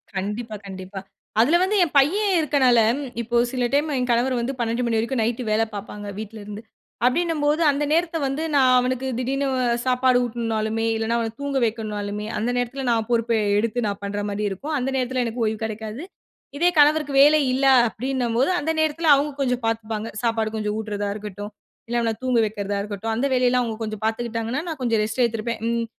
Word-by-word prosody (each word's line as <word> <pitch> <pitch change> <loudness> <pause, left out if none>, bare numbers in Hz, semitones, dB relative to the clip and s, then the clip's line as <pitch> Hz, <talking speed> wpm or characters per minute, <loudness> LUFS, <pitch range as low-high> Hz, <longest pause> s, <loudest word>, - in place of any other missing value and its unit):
கண்டிப்பா, 210 +4 -3
கண்டிப்பா. 190 0 -7 0.4
அதுல 280 +9 +4
வந்து 390 +3 +1
என் 315 -4 -3
பையன் 385 +7 +2
இருக்கனால, 270 -6 +3 0.4
இப்போ 235 +1 -4 0.2
சில 250 -2 0
டைம் 295 +2 +2
என் 250 0 -1
கணவர் 250 +2 +2
வந்து 240 +3 -2
12:00 235 +1 -1
மணி 230 -1 +1
வரைக்கும் 230 +2 0
நைட் 235 +2 -1
வேலை 220 +1 +2
பார்ப்பாங்க. 205 0 -7
வீட்ல 220 +1 -7
இருந்து. 210 +1 -8 0.4
அப்பிடின்னும்போது 305 +2 +1
அந்த 285 +1 -1
நேரத்த 335 +1 +1
வந்து 275 +4 -2
நான் 260 -2 +5
அவனுக்கு 255 +1 -1
திடீர்ன்னு 270 +3 -1 0.4
சாப்பாடு 255 0 +3
ஊட்டனுனாலுமே 225 -1 -2
இல்லன்னா, 225 +1 0
அவன 225 -1 -3
தூங்க 280 -1 -1
வைக்கனுனாலுமே 210 -2 -3
அந்த 225 +3 -1
நேரத்துல 255 +2 -2
நான் 225 -2 0
பொறுப்ப 235 -1 +1 0.2
எடுத்து 230 +2 0
நான் 200 0 -4
பண்றமாரி 205 +1 -3
இருக்கும். 285 - -5
அந்த 255 +1 -1
நேரத்தில 255 -1 0
எனக்கு 230 +1 -2
ஓய்வு 215 0 -1
கிடைக்காது. 220 +4 -6 0.5
இதே 345 +4 +4
கணவருக்கு 295 -1 +4
வேலை 300 +2 +6
இல்ல, 270 +2 +1 0.2
அப்பிடின்னும் 245 0 -2
போது 270 - +3
அந்த 305 +3 -1
நேரத்தில 315 +1 +1
அவுங்க 290 +2 0
கொஞ்சம் 250 -2 0
பார்த்துப்பாங்க. 225 -1 -2 0.2
சாப்பாடு 225 -2 +1
கொஞ்சம் 210 -1 -2
ஊட்டுறதாக 205 -2 -3
இருக்கட்டும். 205 0 -7 0.4
இல்ல 240 - -1
அவன 225 -1 0
தூங்க 250 -2 +2
வக்கிறதா 205 -1 -3
இருக்கட்டும். 210 +2 -4
அந்த 245 +5 0
வேலையெல்லாம் 250 0 +3
அவுங்க 225 -2 -4
கொஞ்சம் 215 -1 -5
பார்த்துக்கிட்டாங்கன்னா, 230 +3 -2
நான் 320 -4 -5
கொஞ்சம் 230 -3 +1
ரெஸ்ட் 220 +4 -2
எடுத்திருப்பேன். 230 0 -2
ம் 235 0 0
235 Hz, 180 wpm, -23 LUFS, 220-265 Hz, 0.5 s, வேலை